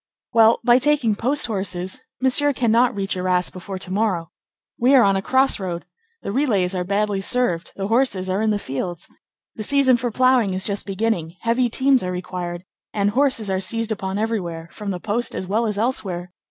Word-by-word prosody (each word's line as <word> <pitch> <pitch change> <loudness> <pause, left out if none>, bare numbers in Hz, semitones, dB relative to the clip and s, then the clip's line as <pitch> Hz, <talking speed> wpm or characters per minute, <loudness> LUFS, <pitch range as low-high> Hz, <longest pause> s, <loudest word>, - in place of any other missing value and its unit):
"Well, 225 0 +5
by 240 +1 +5
taking 275 -5 +2
post 260 +8 0
horses, 190 -4 -3 0.2
Monsieur 280 +3 +2
cannot 240 0 +2
reach 195 -1 -1
Arras 180 -1 0
before 190 +1 -7
to 185 0 -5
morrow. 190 -6 -1 0.5
We 255 +4 +5
are 255 - +7
on 195 -1 +3
a 195 - 0
crossroad. 195 -8 +1 0.4
The - - -3
relays 205 -8 +1
are 180 -1 -1
badly 200 +1 0
served, 195 -6 0
the 195 0 -3
horses 225 -5 +1
are 190 +2 0
in 220 - +1
the 210 - +1
fields. 175 +1 -5 0.5
The 220 - -8
season 260 +2 +3
for 245 0 -2
ploughing 250 -4 +2
is 185 - -1
just 200 0 -2
beginning; 195 -5 -2
heavy 235 +2 +1
teams 265 +2 +3
are 180 - -3
required, 180 -1 -5 0.3
and 205 -1 0
horses 255 -3 +1
are 190 - 0
seized 225 +4 -1
upon 190 -2 -3
everywhere, 175 -7 -3
from 210 -2 -6
the 180 -2 -3
post 220 +6 -2
as - - -3
well 220 +5 0
as 210 -1 -2
elsewhere. 190 -7 -2
205 Hz, 190 wpm, -22 LUFS, 185-240 Hz, 0.5 s, are